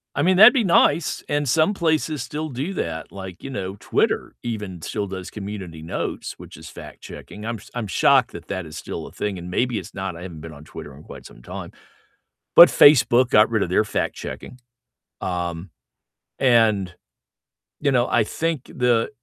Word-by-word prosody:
I - - 0
mean, 185 +1 +3
that'd 215 +6 +9
be 245 -5 +2
nice, 170 -2 +2
and 145 -3 -1
some 160 +8 +3
places 160 -5 0
still 155 +3 -5
do 140 +9 -4
that, 80 - -4
like, 95 -2 -9
you 135 - -6
know, 100 -5 -5
Twitter - - -1
even 105 -6 -5
still 105 -2 -3
does 95 -1 -7
community 95 -6 -7
notes, 80 - -4
which - - -12
is - - -11
fact-checking, 105 - -11
I'm 115 0 -3
s - - -16
I'm 120 -4 -4
shocked 95 - +3
that - - -10
that 95 -3 -4
is 80 0 -9
still - - -6
a - - -12
thing, 100 -3 -4
and 85 +1 -8
maybe 120 +3 0
it's - - -12
not, 95 -2 -4
I 85 - -10
haven't 85 -4 -9
been 80 -1 -9
on 75 +1 -13
Twitter 70 -3 -10
in 75 - -14
quite - - -12
some - - -14
time, - - -8 0.8
but 170 - +11
Facebook 125 -3 +5
got 105 +2 +5
rid 110 -3 +1
of 85 - -4
their 95 - +3
fact-checking, 110 +3 -5 0.7
um, 85 -1 -4 0.7
and, 110 -8 +3 0.9
you 140 -2 +1
know, 125 0 +2
I 115 -2 +2
think 160 +1 -3
the 120 -3 +1
105 Hz, 185 wpm, -22 LUFS, 90-135 Hz, 0.9 s, but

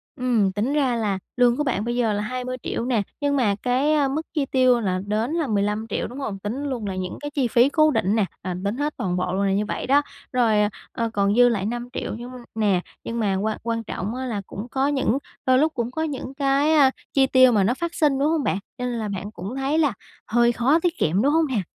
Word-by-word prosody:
Ừm, 235 -6 +1
tính 210 +8 -1
ra 270 -5 +2
là 210 -4 -1 0.2
lương 245 0 +4
của 295 - +1
bạn 220 -7 -1
bây 240 0 -1
giờ 235 -3 +1
là 205 - -1
20.000.000 255 0 -4
nè, 245 -4 +1 0.2
nhưng 285 0 +1
mà 215 -7 +2
cái, 260 +5 +2
a, 290 -2 +3
mức 285 +4 -1
chi 295 -3 0
tiêu 255 -2 +3
là 185 -4 -1
đến 220 +6 0
là 330 -4 0
15.000.000, 210 0 -1
đúng 250 +4 -8
hông? 210 -8 -4
Tính 225 +8 -4
luôn 255 -6 -3
là 190 - -3
những 185 -1 -4
cái 290 0 -5
chi 275 -4 0
phí 240 +3 +4
cố 310 +1 +4
định 200 -5 +1
nè, 215 - +2 0.2
à, 180 -1 -4
tính 210 +5 -1
hết 295 +1 -1
toàn 180 -2 -1
bộ 180 0 -1
luôn 195 - 0
là 195 - +2
như 210 +2 +1
vậy - - -4
đó. 280 +2 +5 0.3
Rồi, 235 -4 +3 0.4
ờ, 230 -1 -2
còn 200 0 +2
dư 245 0 +6
lại 200 -4 -1
5.000.000 240 +2 -4
nhưng 245 +2 -8 0.2
nè, 200 -5 +2 0.2
nhưng 230 0 -4
mà 200 -4 +1
quan 215 +3 -1
quan 230 0 -2
trọng 210 +3 -4
á 260 - -4
là 220 -5 -3
cũng 205 +4 -7
có 270 +1 +1
những 270 -4 +1 0.3
đôi 255 0 +4
lúc 315 +1 +2
cũng 235 0 -2
có 315 +5 -2
những 275 -3 -4
cái, 280 +2 +2
a, 280 -4 +6 0.2
chi 270 -1 +4
tiêu 255 -1 +6
mà 210 -4 +3
nó 220 +6 +2
phát 340 +5 -4
sinh, 290 -4 +2
đúng 285 - +2
hông 320 -3 +1
bạn? - - 0 0.2
Cho 250 - -3
nên 240 -2 -2
là 215 - -2
bạn 200 +1 -5
cũng 200 +6 -7
thấy 275 +4 0
là 290 -8 +2 0.3
hơi 235 +1 +3
khó 255 +7 +2
tiết 345 0 -1
kiệm, 180 +6 +1
đúng 285 +3 +3
hông 325 -1 +3
nè? 250 -7 0
245 Hz, 255 wpm, -23 LUFS, 210-275 Hz, 0.4 s, dư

